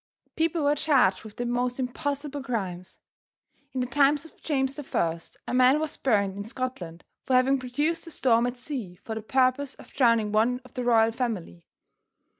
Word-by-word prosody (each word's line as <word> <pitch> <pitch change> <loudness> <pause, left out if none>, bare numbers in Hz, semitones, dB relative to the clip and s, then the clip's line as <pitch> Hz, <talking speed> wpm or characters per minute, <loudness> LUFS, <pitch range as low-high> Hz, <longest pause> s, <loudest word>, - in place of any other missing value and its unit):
People 325 -1 +1
were 285 0 +4
charged 280 -11 +3
with 215 -2 -11
the 245 - -2
most 245 +1 -1
impossible 285 +2 -3
crimes. 190 -9 -4 0.7
In 260 -1 -2
the - - 0
time 280 +3 +4
of 305 +2 -9
James 270 -3 0
the 295 - -6
First, 165 - -2
a - - -3
man 255 +3 +5
was 310 -1 -2
burned 200 -6 +1
in 200 - -5
Scotland 220 -8 -5 0.2
for 260 - +3
having 265 +2 +4
produced 290 +7 -2
a - - -6
storm 240 -6 +2
at 245 +1 -4
sea 245 -9 -5
for 210 +5 -7
the 220 - -4
purpose 260 +3 +1
of - - -16
drowning 230 -5 +3
one 230 +4 +2
of 255 - -16
the 250 - -3
royal 225 -2 +4
family. 220 - -4
250 Hz, 185 wpm, -27 LUFS, 220-275 Hz, 0.7 s, man